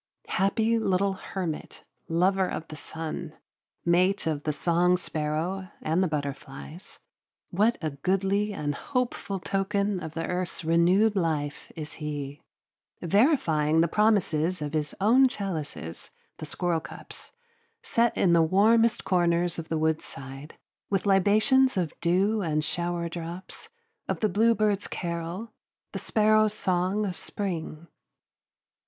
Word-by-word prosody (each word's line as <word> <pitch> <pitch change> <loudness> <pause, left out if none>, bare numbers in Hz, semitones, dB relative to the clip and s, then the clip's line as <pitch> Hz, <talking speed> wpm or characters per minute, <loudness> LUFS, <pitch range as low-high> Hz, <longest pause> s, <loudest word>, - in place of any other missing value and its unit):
Happy 220 +4 +2
little 195 -1 +1
hermit, 185 -4 -5 0.2
lover 185 +3 +2
of 165 - -5
the 155 - -7
sun, 160 0 -6 0.5
mate 180 +3 +3
of 155 -3 -1
the 155 - +1
song 175 +4 +2
sparrow 165 +4 -3
and 160 +4 0
the 185 - +3
butterflies, 150 +2 -6 0.5
what 215 +6 +2
a 155 - -1
goodly 195 +8 0
and 150 -7 -2
hopeful 245 - -2
token 200 +1 0
of 160 -2 -7
the 165 - -2
earth's 180 -1 -3
renewed 180 +6 +4
life 155 -5 -2
is 150 -3 -6
he, 145 -1 -5 0.6
verifying 165 - +3
the 170 - +3
promises 185 -4 +2
of 150 0 -4
his 150 -1 -2
own 245 +7 +5
chalices, 160 - -5 0.3
the 155 - -7
squirrelcups, 170 0 -4 0.5
set 235 0 +1
in 175 - +4
the 170 - +6
warmest 220 +7 +4
corners 175 -2 +1
of 160 - -7
the 160 - 0
woodside, 150 -3 -3 0.3
with 195 -1 0
libations 215 +7 +4
of 175 -4 -1
dew 195 +5 +2
and 155 -4 0
shower 170 +1 -2
drops, 170 +2 -7 0.4
of - - -2
the 215 - +3
bluebird's 215 -1 +2
carol, 170 +5 -4 0.4
the - - -4
sparrow's 215 0 +3
song 185 +3 0
of 185 -3 -3
spring. 170 -5 -5
180 Hz, 125 wpm, -27 LUFS, 160-200 Hz, 0.6 s, the